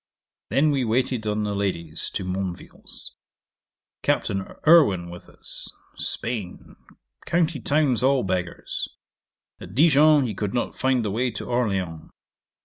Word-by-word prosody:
Then 150 +2 +3
we 135 -3 +1
waited 120 -1 0
on 105 0 0
the 105 -1 -2
ladies 85 -6 +2
to 100 - -2
Monville's. 90 -1 -6 0.9
Captain 95 0 -1
Irwin 100 - +5
with 90 - -11
us. - - -9 0.3
Spain. 110 -7 -5 0.5
County 170 -3 +1
towns 140 -6 +1
all 135 0 +3
beggars. 90 -2 -3 0.7
At 90 +3 -11
Dijon 150 0 +5
he 110 - -3
could 105 +3 -3
not 120 - -1
find 130 -3 +1
the 105 - -1
way 125 +5 0
to 110 - -6
Orleans. 95 -10 -2
110 Hz, 130 wpm, -24 LUFS, 95-135 Hz, 0.9 s, Irwin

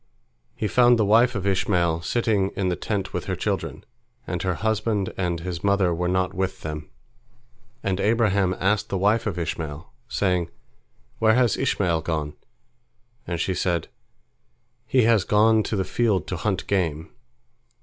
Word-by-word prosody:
He 110 - -2
found 120 +2 +5
the 110 - +2
wife 115 +4 +4
of 100 -1 -3
Ishmael 85 -4 +1
sitting 105 -1 +1
in 95 -2 0
the 90 - 0
tent 100 -1 -3
with - - -3
her - - -2
children, - - -3 0.4
and 90 -2 -3
her 90 -1 -1
husband 110 -1 -1
and 90 -3 -1
his 85 -1 -5
mother 100 -3 +2
were 90 +1 -1
not 90 0 0
with 95 +1 -3
them. 75 -1 -6 0.9
And 95 -1 -1
Abraham 100 -4 +2
asked 100 +3 +1
the 100 - -1
wife 105 +4 +2
of 95 -4 -3
Ishmael, 80 0 -5
saying, 90 -6 0 0.7
"Where 110 0 +4
has 125 -4 +3
Ishmael 85 -4 0
gone?" 75 -2 -3 0.9
And 85 -2 -3
she 95 - 0
said, 85 -2 -1 1.0
"He 130 -2 +3
has 110 -3 +4
gone 110 +2 +4
to 105 - -3
the 95 -2 0
field 105 -7 +1
to 90 - -2
hunt 95 +2 -2
game." 85 -5 -1
95 Hz, 160 wpm, -24 LUFS, 85-105 Hz, 1.0 s, found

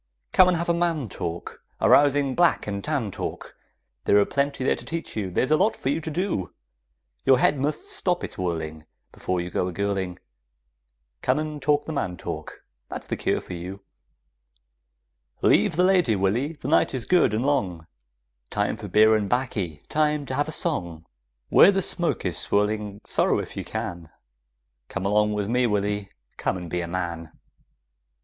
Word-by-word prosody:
Come 185 - +6
and 180 -2 +3
have 170 - -2
a 170 - +3
man 165 -8 0
talk, 85 -1 -6 0.2
A - - +2
rousing 140 -1 +4
black 175 +4 +3
and 100 -1 -4
tan 140 -9 -1
talk, - - -6 0.5
There 100 - +5
are 100 - +5
plenty 140 -1 -1
there - - +2
to - - -10
teach 165 0 -5
you; 100 -4 -2
there's 125 +10 0
a 155 - +6
lot 210 +6 +2
for 130 - -3
you 150 +4 0
to 160 - -5
do; 170 - -2 0.7
Your 130 - +5
head 140 +2 +3
must 150 - -1
stop 185 - -1
its - - -5
whirling 80 -3 -4 0.2
Before 90 -1 -2
you 90 0 -4
go 90 - 0
a - - -3
girling; 95 -1 -2 1.0
Come 130 +2 +2
and 155 -1 -4
talk 145 +1 +2
the 160 - -4
man 90 -11 -2
talk; - - -7 0.3
that's - - -6
the - - -2
cure - - 0
for - - -9
you 90 +3 -7 1.6
Leave - - +4
the 180 - +3
lady, 180 - +4
Willy, 110 +11 0
the 145 - -8
night 145 -2 +3
is 125 - -3
good 180 -10 +4
and 110 +4 -1
long, 95 - 0 0.6
Time - - -1
for - - -7
beer 110 +1 +5
and 105 -2 -1
'baccy, 100 - -2
time 150 -1 +1
to 130 - -5
have 145 +3 0
a - - -4
song; 85 - -3 0.4
Where 195 - +8
the 195 -1 0
smoke 175 - -1
is 90 -3 +1
swirling, 105 0 0
sorrow - - +2
if - - -5
you - - -4
can 85 -2 -5 0.8
Come 100 -1 -4
along 105 +1 +2
with 105 -1 -1
me, 125 +2 +2
Willy, 105 -1 -1 0.3
come - - -1
and 90 -2 -8
be 90 - -1
a 85 - -4
man! 85 -2 -4
110 Hz, 185 wpm, -25 LUFS, 95-150 Hz, 1.6 s, Where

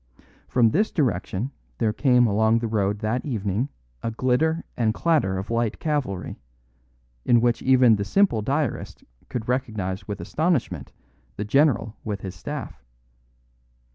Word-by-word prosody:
From 115 -3 +3
this 210 - +2
direction 120 - -1 0.3
there 110 -1 +1
came 125 0 +4
along 110 +1 +3
the 115 - -2
road 105 -2 0
that 115 +3 -1
evening 110 -1 -1 0.3
a - - -2
glitter 130 +8 +1
and 110 -2 +1
clatter 150 - +1
of 95 +4 -5
light 115 -1 0
cavalry, 140 - -2 0.8
in 120 - +4
which 120 0 +1
even 130 -4 +5
the 100 - -1
simple 190 - +2
diarist 140 +3 -2 0.3
could 115 -3 -4
recognise 110 -7 -2
with 105 -3 -4
astonishment 115 - -1 0.4
the 105 - -3
general 115 -3 +2
with 105 -3 -4
his 95 -2 -6
staff. 90 - -7
115 Hz, 140 wpm, -24 LUFS, 105-130 Hz, 0.8 s, even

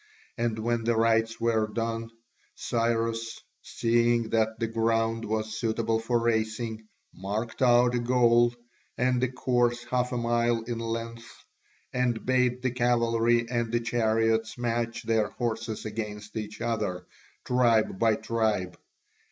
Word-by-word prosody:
And 115 -2 -1
when 115 +1 -1
the 115 0 +1
rites 115 0 +2
were 115 -2 +1
done, 115 0 -3 0.5
Cyrus, 115 -1 -1 0.2
seeing 115 0 +1
that 110 0 +1
the 115 - 0
ground 115 0 0
was 110 0 -2
suitable 115 0 0
for 120 +2 0
racing, 110 -1 -1 0.3
marked 105 +6 -4
out 120 -1 +5
a 120 - +1
goal, 120 -1 +3 0.4
and 125 0 +1
a 130 - +1
course 120 -2 +1
half 125 0 -1
a 125 - -1
mile 120 -1 +1
in 115 0 -4
length, 115 0 -6 0.5
and 125 -3 0
bade 125 -1 +1
the 130 - +1
cavalry 120 -1 +2
and 120 -2 -1
the 120 - +2
chariots 115 -1 +1
match 120 0 -2
their 110 -2 +1
horses 115 -2 -3
against 105 -1 -6
each 105 -1 -6
other, 105 -6 -2 0.4
tribe 115 -5 +2
by 110 -2 +3
tribe. 105 -7 -1
115 Hz, 135 wpm, -27 LUFS, 110-120 Hz, 0.5 s, out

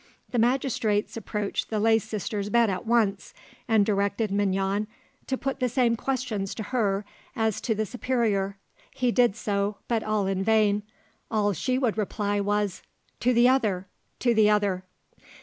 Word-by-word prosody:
The 245 - +1
magistrates 235 -4 +1
approached 210 -2 -3
the 215 - -1
lay 225 +1 +4
sister's 210 -1 -4
bed 230 -1 +3
at 185 +4 -4
once, 220 -4 +1 0.3
and 220 -4 +4
directed 200 +1 0
Mignon 195 +1 0 0.4
to 265 - -1
put 270 0 -3
the 250 -1 +1
same 240 -1 +2
questions 230 -6 -2
to 220 - -4
her 205 -5 0 0.3
as 220 -2 0
to 225 - 0
the 215 +1 -1
superior: 215 -4 -1 0.3
he 250 -1 0
did 240 -4 +3
so, 205 -2 -1
but 230 -2 +1
all 215 -2 0
in 190 0 -1
vain; 210 -1 +3 0.5
all 205 -2 +1
she 255 - -1
would 240 -5 0
reply 205 0 -1
was, 205 -1 -1 0.4
"To 250 - +2
the 240 0 +5
other! 215 -8 +2 0.4
To 240 -2 +3
the 215 -2 +5
other!" 200 -3 +1
215 Hz, 160 wpm, -26 LUFS, 200-235 Hz, 0.5 s, the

